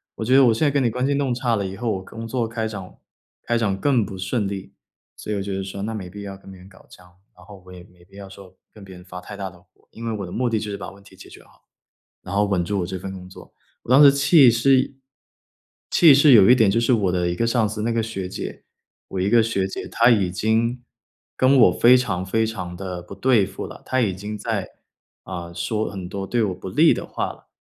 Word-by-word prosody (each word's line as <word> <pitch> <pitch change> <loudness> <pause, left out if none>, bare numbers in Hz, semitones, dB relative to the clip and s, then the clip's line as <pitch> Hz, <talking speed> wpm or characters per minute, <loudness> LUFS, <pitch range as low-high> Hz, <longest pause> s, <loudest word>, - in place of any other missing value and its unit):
我 110 - -5
觉 125 - +1
得 135 0 +7
我 120 - +5
现 115 - 0
在 145 - +3
跟 140 -1 +1
你 120 - +2
关 125 +4 -2
系 140 - +1
弄 140 -2 0
差 120 -1 0
了 100 - -2
以 95 - -8
后， 115 -1 -2
我 95 - -3
工 115 +3 -9
作 120 0 -2
开 110 -1 -3
展 95 -4 -8 0.5
开 120 - -1
展 105 -4 0
更 130 -3 +2
不 100 -1 -7
顺 100 +3 -2
利。 100 0 -7 0.4
所 105 - -7
以 - - -1
我 100 - -2
觉 100 -1 -4
得 95 - -3
说 95 +1 -6
那 110 +2 -3
没 95 -4 -6
必 100 +2 -9
要 100 -1 -7
跟 95 0 -15
别 95 - -13
人 90 - -15
搞 95 -1 -19
僵， 90 - -17 0.3
然 - - -17
后 100 -3 -14
我 - - -12
也 90 -1 -11
没 90 -1 -22
必 100 +2 -18
要 100 - -9
说 95 -1 -15 0.2
跟 105 - -14
别 95 -1 -12
人 90 0 -14
发 90 -1 -9
太 100 - -10
大 100 - -4
的 90 0 -19
火。 90 - -34
因 115 +1 -9
为 115 - -1
我 100 - -5
的 90 - -10
目 125 0 -1
的 110 - 0
就 105 -1 -5
是 - - -4
把 - - -7
问 100 0 -17
题 - - -18
解 - - -14
决 - - -15
好， - - -27 0.6
然 95 - -7
后 105 +1 +2
稳 95 -3 0
住 100 +2 -2
我 85 - -2
这 95 0 -5
份 95 +2 -7
工 90 -1 -10
作。 95 - -14 0.3
我 - - -10
当 135 +3 +7
时 140 - +9
气 140 -1 +5
是 130 +3 +2 0.9
气 160 -5 +7
是 140 +1 +6
有 105 -4 +7
一 125 - +8
点 110 -5 +3
就 115 +4 +1
是 120 +2 +2
我 100 -5 0
的 90 -1 0
一 85 - -2
个 115 - 0
上 115 -2 +1
司 110 0 -5
那 115 +1 -1
个 115 - 0
学 95 -5 -5
姐， - - -7 0.4
我 95 - -4
一 95 - 0
个 115 +1 +5
学 100 -4 -1
姐， - - -6
她 115 +1 +3
已 100 -7 +3
经 115 +5 0 0.5
跟 130 +2 +4
我 115 - +7
非 120 +8 +5
常 95 -7 -2
非 110 +4 0
常 90 -6 -6
地 90 -1 -6
不 90 - -11
对 125 -6 +3
付 - - -7
了， - - -12
她 130 - 0
已 105 -6 +1
经 105 +3 -6
在 105 -2 -3 0.5
啊， 85 -2 -7
说 105 +6 -2
很 95 -3 -7
多 95 +1 -5
对 120 +2 0
我 95 -4 -1
不 95 +1 -9
利 155 - +4
的 - - -4
话 - - -3
了。 - - -21
105 Hz, 295 characters per minute, -22 LUFS, 95-115 Hz, 0.9 s, 时